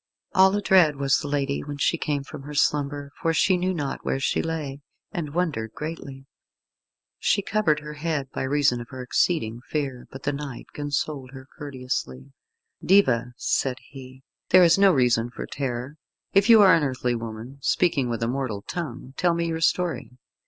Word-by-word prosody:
All 190 +1 +5
adread 185 -7 +4
was 140 0 +2
the - - -5
lady 140 -1 -1
when 145 0 -6
she 145 - +2
came 145 -4 -2
from 135 - -9
her 145 +2 -8
slumber, 145 -1 0
for 165 0 +1
she 185 - +4
knew 180 +1 0
not 145 -6 -3
where 135 - -1
she 135 - 0
lay, 150 -4 -4 0.3
and 155 -3 -5
wondered 145 -11 -1
greatly. 140 -4 -7 0.9
She 200 - +1
covered 175 -9 +1
her 150 0 -8
head 150 -2 -2
by - - -4
reason 135 -2 +2
of 120 - -10
her 130 -2 -7
exceeding 120 -3 0
fear, 135 -5 -3
but 135 - -10
the 145 - 0
knight 140 -3 -6
consoled 145 -2 -3
her 130 -1 -10
courteously. 125 - -5 0.5
"Diva," 125 -11 +3
said 130 -1 0
he, 130 -1 -12 0.3
"there 185 0 +7
is 170 -1 +6
no 195 0 +5
reason 120 -5 +2
for - - -7
terror. 130 +1 -4 0.4
If 195 +3 +4
you 225 -2 +9
are 190 -3 +7
an 165 - +4
earthly 130 -3 -1
woman, 115 +3 -7
speaking 140 -5 +1
with 115 -1 -2
a - - +1
mortal 120 -5 -3
tongue, 135 -7 -6
tell 175 -2 +2
me 170 0 0
your 165 -1 -2
story. 165 -7 0
145 Hz, 180 wpm, -25 LUFS, 130-165 Hz, 0.9 s, you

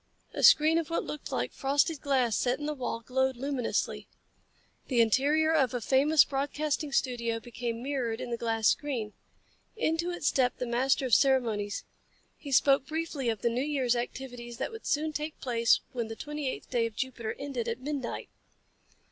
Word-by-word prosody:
A - - -3
screen 315 +2 +6
of 330 - -4
what 335 - -1
looked 300 - -7
like 125 0 -2
frosted 285 +3 +1
glass 260 -6 +1
set 250 +1 +1
in 295 - -6
the 300 - -1
wall 250 -4 -4
glowed 265 +2 0
luminously. 270 -1 -2 0.8
The 250 -3 +1
interior 290 +8 +3
of 265 -6 +2
a - - 0
famous 280 +6 +4
broadcasting 290 +2 -2
studio 235 -4 0
became 235 0 -5
mirrored 255 -5 -2
in 245 - -5
the 235 - -1
glass 225 -1 0
screen. 245 -8 -1 0.6
Into 335 -4 0
it 350 -2 -5
stepped 260 -3 +2
the 250 - -2
master 260 +3 +1
of 250 - -2
ceremonies. 225 -7 +2 0.5
He 285 - -9
spoke 270 0 +4
briefly 310 -5 -2
of 225 -3 -3
the 235 - +3
New 240 +2 -1
Year's 270 -5 +1
activities 240 -1 -5
that 265 - -3
would 450 0 -9
soon 310 +1 0
take 300 +1 -4
place 235 -2 +2
when 240 -4 -3
the 225 - -6
twenty 295 +1 -4
eighth - - -7
day 235 -2 +2
of 225 - -11
Jupiter 240 -2 -3
ended 270 -5 -4
at 230 +1 -2
midnight. 275 -2 -4
260 Hz, 180 wpm, -29 LUFS, 235-290 Hz, 0.8 s, screen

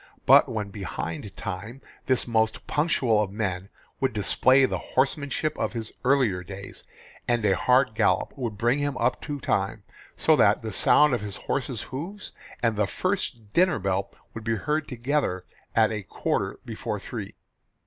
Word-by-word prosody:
But - - +7
when 105 -2 -3
behind 95 -1 -5
time 100 +5 -6 0.3
this 130 -1 +2
most 110 -2 +1
punctual 130 -8 +2
of 100 -2 -2
men 95 -3 -3 0.3
would 135 -3 0
display 130 +6 +4
the - - -2 0.2
horsemanship 140 +3 +1
of - - -1
his 115 -2 -5
earlier 125 -9 +2
days, 95 +2 -9 0.4
and 120 -3 +1
a 95 -2 +4
hard 125 +1 +3
gallop - - +1
would 120 -6 -4
bring 120 +6 +2
him 145 -1 -1
up 120 +2 0
to 145 -1 -5
time - - -1 0.3
so - - +4
that - - +4
the - - -4
sound 150 -2 +5
of 120 - 0
his 105 -1 -5
horse's 130 -3 -2
hoofs 175 +10 -7 0.3
and 115 -3 +2
the 105 -1 +2
first 120 - -2
dinner 180 0 +4
bell 95 -1 -1 0.2
would 110 - -7
be 115 0 0
heard 150 +8 -1
together 125 -6 -1 0.3
at 110 -1 +4
a 105 -2 -3
quarter - - -2
before - - -4
three. - - -7
115 Hz, 165 wpm, -26 LUFS, 100-135 Hz, 0.4 s, But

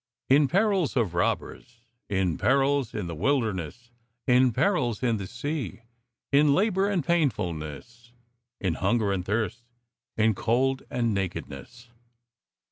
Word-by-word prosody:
" - - -54
In 145 -1 +4
perils 195 -1 +1
of 105 -8 +1
robbers, 115 +6 -2 0.3
in 95 -5 0
perils 135 -1 +2
in - - -3
the 85 - -5
wilder 115 - +1
ness, 95 +8 -8 0.3
in 125 0 +4
perils 125 - 0
in 115 -3 +2
the 95 -2 -6
sea... 145 - -4 0.5
in 140 0 +5
labour 200 -1 +2
and 180 -8 -1
painfulness, 115 - -2 0.5
in 95 -4 0
hunger 100 +3 +1
and 95 -2 -2
thirst, 110 +4 -2 0.5
in 110 0 +3
cold 130 +6 +1
and 120 -3 0
nakedness." 100 - -6
120 Hz, 130 wpm, -26 LUFS, 100-140 Hz, 0.5 s, in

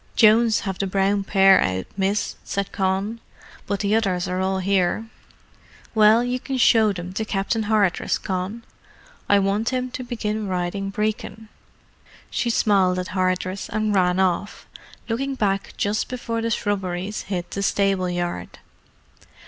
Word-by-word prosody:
"Jones 225 0 +5
have 195 -2 -4
the 195 - 0
brown 195 +1 +1
pair 195 -1 +5
out, 95 0 -1
miss," 195 +2 0
said 200 0 -3
Con. 195 +3 -1 0.5
"But 200 -1 -1
the 205 0 +1
others 190 -5 0
are 185 0 -2
all 190 0 0
here." 190 +2 +1 0.9
"Well, 220 +1 +5
you 250 +1 -1
can 265 +1 -4
show 225 -3 +5
them 180 -1 -6
to 220 - -2
Captain 215 +1 -1
Hardress, 205 -5 +2
Con. 190 +4 -4 0.7
I 205 - +6
want 200 +3 +1
him 255 -1 -2
to 255 - -5
begin 220 -3 -3
riding 185 +2 -2
Brecon." 215 +1 -3 0.8
She 240 - -1
smiled 195 -5 +3
at 180 0 -3
Hardress, 185 0 -1
and 215 0 0
ran 180 -1 +2
off, 190 +2 -1 0.4
looking 270 +4 -2
back 195 -5 -1
just 205 +1 0
before 235 -2 -3
the 230 - -1
shrubberies 195 -2 -2
hid 180 -3 -4
the 200 - -3
stable 195 -2 +1
yard. 175 - -4
200 Hz, 150 wpm, -23 LUFS, 185-220 Hz, 0.9 s, I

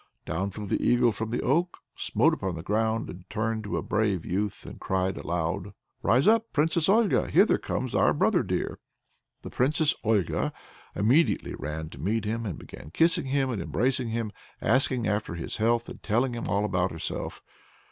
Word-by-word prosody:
Down 95 +5 -2
flew 105 +2 -7
the 95 - -1
eagle 120 -1 +4
from 110 +1 -4
the 120 - -2
oak, 170 +7 +1 0.2
smote - - +2
upon 95 -2 -2
the 80 - -6
ground, 110 -3 -1
turned 110 0 -1
into - - -1
a - - -2
brave 105 -5 0
youth, 100 +2 -2
and - - -9
cried 95 0 0
aloud: 85 +3 -2 0.3
"Rise 130 - +3
up, 225 +1 +4
Princess 160 +3 +2
Olga! 220 +1 +3
Hither - - +4
comes - - -3
our - - +4
brother - - +3
dear!" - - -2 0.6
The - - -7
Princess 150 +4 +2
Olga 105 -6 +1 0.4
immediately 130 - +2
ran 75 +1 -5
to - - -11
meet 105 +4 0
him, 115 +1 -2
and 90 - -4
began 75 - -11
kissing 165 - +2
him 135 -1 +1
and 110 - -2
embracing 120 - 0
him, 115 -1 -2 0.3
asking 130 -3 +1
after 105 -4 -1
his 85 - -4
health 115 +1 +1
and - - -9
telling 120 +4 +1
him 120 - -4
all 100 +1 +1
about 90 -2 +1
herself. 80 - -5
110 Hz, 180 wpm, -27 LUFS, 95-130 Hz, 0.6 s, eagle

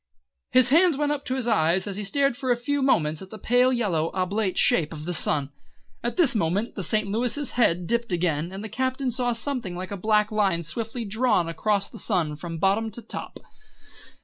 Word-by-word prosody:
His 255 -1 +4
hands 330 +1 +4
went 295 0 0
up 290 -1 -3
to 260 - -1
his 255 -3 -2
eyes 185 -4 +2
and 200 -2 -4
he 210 - -4
stared 275 +5 +1
for 255 0 -2
a - - +4
few 285 +4 -1
moments 155 - +1
at 190 - -10
the 220 - -9
pale 245 +4 +3
yellow 185 -10 0
oblate 190 +1 -1
shape 160 -1 +2
of 155 -1 -8
the 180 - -2
sun. 145 -3 +2 0.5
At 240 +6 -3
this 330 -9 +4
moment 205 +2 -1
the - - -5
St. 215 +2 +1
Louis' 245 +7 0
head 180 -8 +1
dipped 235 +2 -1
again, 170 -2 -1
and 195 +2 -7
the - - -4
Captain 260 +3 -2
saw 245 +1 0
something 235 -5 -3
like 185 +2 -6
a 200 - -4
black 210 +2 +2
line 195 -5 +1
swiftly 225 +7 -4
drawn 215 -4 +1
across 200 +4 0
the - - -10
sun 170 -8 0
from 165 +1 -6
bottom 200 +6 +1
to 230 +3 -8
top. - - -6
215 Hz, 210 wpm, -25 LUFS, 180-245 Hz, 0.5 s, His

